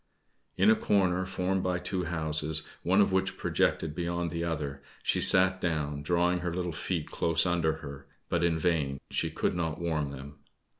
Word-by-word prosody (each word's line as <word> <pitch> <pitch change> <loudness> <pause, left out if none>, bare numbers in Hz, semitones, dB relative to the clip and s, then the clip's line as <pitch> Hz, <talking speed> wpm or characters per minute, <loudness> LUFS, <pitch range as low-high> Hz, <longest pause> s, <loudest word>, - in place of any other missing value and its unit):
In 100 +4 +5
a - - +5
corner 95 -4 +1
formed 95 0 -1
by 90 -1 -1
two 90 0 -3
houses, 80 -1 -1 0.2
one 95 +3 +3
of 100 - +2
which 95 0 0
projected 80 -2 0
beyond 85 0 -3
the 85 0 -3
other, 70 -4 -4 0.2
she - - +1
sat 95 0 +7
down, 75 -4 -2
drawing 90 +3 +1
her 90 -1 -3
little 90 0 -3
feet 80 0 -4
close 85 0 +1
under 85 -3 +1
her, 70 -1 -10 0.2
but 85 -1 -1
in 85 -1 +1
vain 75 -5 -1
she - - -1
could - - -1
not 80 -3 -3
warm 80 -4 -2
them. 70 +1 -10
85 Hz, 180 wpm, -29 LUFS, 75-90 Hz, 0.2 s, sat